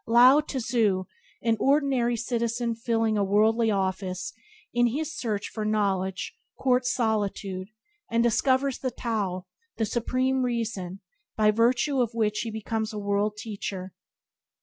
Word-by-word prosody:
Lao 245 +5 +7
tze, 260 -5 -4 0.7
an 230 -1 +2
ordinary 270 -4 +2
citizen 235 0 -1
filling 225 -2 0
a - - +3
worldly 220 +3 +3
office, 190 -2 -2 0.4
in 240 0 +4
his 295 +5 -3
search 215 -7 -2
for 215 - -4
knowledge 195 -3 -1 0.2
courts 250 -1 +2
solitude, 205 -5 -1 0.4
and 230 0 +2
discovers 260 +3 +2
Tao, 215 -7 -2 0.3
the 225 - +1
Supreme 255 +3 0
Reason, 225 -6 -2 0.4
by 215 -1 +5
virtue 240 +5 +2
of 235 -1 -1
which 210 -2 +1
he 230 - -2
becomes 220 0 -3
a - - -5
world 205 +1 0
teacher. 200 -4 -5
225 Hz, 125 wpm, -27 LUFS, 205-245 Hz, 0.7 s, Lao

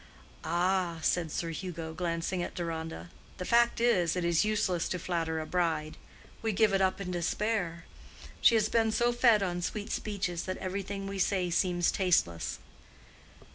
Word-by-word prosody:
"Ah!" 175 +1 +1
said 170 -3 +1
Sir 165 +1 -2
Hugo, 165 -2 -5
glancing 170 +1 -2
at - - -5
Deronda, 160 - -5 0.3
"the 180 - -5
fact 235 +2 +3
is, 185 -9 +3
it 180 -1 -1
is 170 +1 +3
useless 205 -5 0
to 180 - -1
flatter 165 -2 -2
a 155 - -4
bride. 160 -3 -1 0.5
We 225 -1 0
give 210 +1 +3
it 195 - +3
up 190 0 +1
in 180 -2 -4
despair. 175 -1 -1 0.6
She 230 - +6
has 215 -1 +3
been 225 0 +2
so 240 +2 +2
fed 235 -4 +4
on 175 -2 -2
sweet 210 +4 -4
speeches 190 -5 -2
that 185 - -3
every 190 +1 -3
thing 195 0 -5
we 195 0 -4
say 185 -2 +1
seems 175 0 +2
tasteless." 165 - +1
180 Hz, 170 wpm, -30 LUFS, 170-200 Hz, 0.6 s, She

